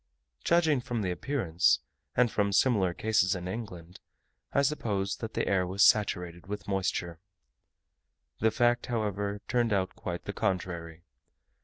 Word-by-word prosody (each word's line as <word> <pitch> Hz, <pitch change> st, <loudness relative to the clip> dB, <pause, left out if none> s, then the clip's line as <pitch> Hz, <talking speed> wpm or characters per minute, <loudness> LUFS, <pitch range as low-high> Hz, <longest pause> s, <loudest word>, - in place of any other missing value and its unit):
Judging 160 Hz, -6 st, +3 dB
from 120 Hz, -3 st, -3 dB
the 90 Hz, -, -1 dB
appearance, 90 Hz, -, +1 dB, 0.4 s
and 120 Hz, -2 st, +4 dB
from 100 Hz, -1 st, +1 dB
similar 100 Hz, -4 st, +3 dB
cases 95 Hz, -1 st, +1 dB
in 90 Hz, 0 st, -5 dB
England, 90 Hz, -4 st, -7 dB, 0.5 s
I 140 Hz, -, +2 dB
supposed 105 Hz, -9 st, -1 dB
that 110 Hz, -1 st, -6 dB
the -, -, 0 dB
air 95 Hz, -2 st, +2 dB
was 95 Hz, +2 st, +2 dB
saturated 90 Hz, -5 st, +2 dB
with 105 Hz, +1 st, -6 dB
moisture. 90 Hz, -4 st, -2 dB, 1.2 s
The 110 Hz, -, +4 dB
fact, 120 Hz, +1 st, +2 dB
however, 105 Hz, -3 st, -2 dB
turned 120 Hz, -2 st, +1 dB
out 95 Hz, -2 st, 0 dB
quite 90 Hz, -1 st, -5 dB
the -, -, -4 dB
contrary. 85 Hz, -3 st, -3 dB
100 Hz, 140 wpm, -29 LUFS, 90-115 Hz, 1.2 s, and